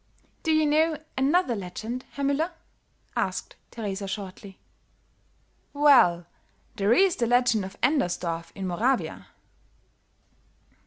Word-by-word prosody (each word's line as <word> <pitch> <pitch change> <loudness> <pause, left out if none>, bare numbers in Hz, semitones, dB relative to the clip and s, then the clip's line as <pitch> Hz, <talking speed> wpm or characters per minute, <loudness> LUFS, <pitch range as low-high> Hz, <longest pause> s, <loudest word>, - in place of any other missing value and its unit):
"Do 320 - 0
you 310 0 +3
know 310 +1 +2 0.2
another 275 0 +2
legend, 220 +6 -6
Herr 280 - -3
Müller?" 285 +5 +1 0.7
asked - - -2
Teresa, 200 -3 -5
shortly. 195 0 -7 1.2
"Well, 255 - +5 0.5
there 200 +2 +1
is 380 +6 +4
the 235 - 0
legend 245 -3 +3
of 190 - -10
Endersdorf 175 - 0
in 195 - -5
Moravia. 235 +9 -1
240 Hz, 105 wpm, -26 LUFS, 195-290 Hz, 1.2 s, Well